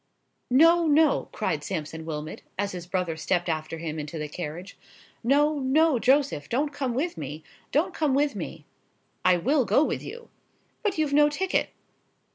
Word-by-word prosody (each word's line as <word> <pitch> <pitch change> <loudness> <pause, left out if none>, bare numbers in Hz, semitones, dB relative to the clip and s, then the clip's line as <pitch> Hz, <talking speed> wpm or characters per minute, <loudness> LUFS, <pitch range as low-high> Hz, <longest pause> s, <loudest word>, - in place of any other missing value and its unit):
"No,—no," 320 +2 +4
cried 165 -8 -2
Sampson 160 -3 -5
Wilmot, 155 -1 -5 0.2
as 200 +1 -1
his 180 -1 -7
brother 180 -3 -1
stepped 175 +2 -1
after 160 0 -2
him 160 -1 -4
into 150 +2 -6
the 150 -1 -3
carriage; 175 +4 -7 0.5
"no,—no, 290 +2 +3
Joseph, 265 - +2
don't 285 +4 0
come 265 -4 -2
with 335 +7 -2
me,—don't - - -3
come 295 -4 +1
with 285 -2 +1
me!" 165 -4 -6 0.6
"I 180 -1 +5
will 270 - +2
go 275 - +3
with - - -2
you." 475 0 -9 0.5
"But 415 -6 -1
you've 305 -2 0
no 295 +1 +6
ticket." 375 +6 0
245 Hz, 150 wpm, -26 LUFS, -, 0.6 s, no